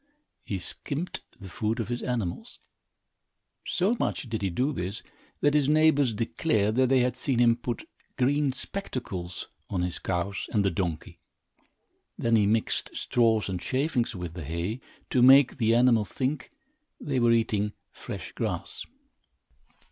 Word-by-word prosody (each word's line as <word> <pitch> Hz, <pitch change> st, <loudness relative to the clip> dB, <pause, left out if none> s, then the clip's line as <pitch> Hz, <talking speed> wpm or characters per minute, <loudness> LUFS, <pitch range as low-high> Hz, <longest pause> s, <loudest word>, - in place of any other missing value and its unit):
He 100 Hz, -, -3 dB
skimped 145 Hz, -, -4 dB, 0.2 s
the 95 Hz, -, -9 dB
food 110 Hz, +5 st, -2 dB
of 115 Hz, -, -3 dB
his 120 Hz, 0 st, -2 dB
animals. 115 Hz, -9 st, -3 dB, 1.1 s
So 195 Hz, +7 st, +1 dB
much -, -, -1 dB
did 110 Hz, -2 st, -3 dB
he 100 Hz, -, 0 dB
do 130 Hz, -, 0 dB
this, 95 Hz, -1 st, -4 dB, 0.4 s
that 145 Hz, -, +3 dB
his 145 Hz, -2 st, +3 dB
neighbors 150 Hz, -4 st, +4 dB
declared 110 Hz, -2 st, +1 dB
that 130 Hz, -1 st, +4 dB
they 130 Hz, -1 st, +4 dB
had 125 Hz, 0 st, +1 dB
seen 130 Hz, -2 st, -1 dB
him 120 Hz, -1 st, +5 dB
put 120 Hz, -1 st, -5 dB, 0.3 s
green 140 Hz, +2 st, +2 dB
spectacles 120 Hz, -, -5 dB, 0.2 s
on 90 Hz, -3 st, -1 dB
his 90 Hz, -1 st, -3 dB
cows 95 Hz, +2 st, -2 dB
and 105 Hz, -2 st, +2 dB
the 100 Hz, -, +2 dB
donkey. 85 Hz, -3 st, -3 dB, 1.0 s
Then 115 Hz, 0 st, +2 dB
he 105 Hz, -2 st, +4 dB
mixed 110 Hz, +1 st, 0 dB
straws 115 Hz, -3 st, +2 dB
and 90 Hz, -2 st, -3 dB
shavings 130 Hz, -, 0 dB
with 90 Hz, -3 st, -5 dB
the 85 Hz, -2 st, -6 dB
hay 85 Hz, -, -3 dB, 0.3 s
to 125 Hz, -, +3 dB
make 135 Hz, +1 st, +7 dB
the 115 Hz, 0 st, +3 dB
animals 115 Hz, -4 st, +4 dB
think 130 Hz, +1 st, -2 dB, 0.5 s
they 135 Hz, -3 st, -1 dB
were 120 Hz, -1 st, +4 dB
eating 105 Hz, -2 st, +1 dB, 0.2 s
fresh -, -, -7 dB
grass. -, -, -4 dB
115 Hz, 150 wpm, -27 LUFS, 100-130 Hz, 1.1 s, make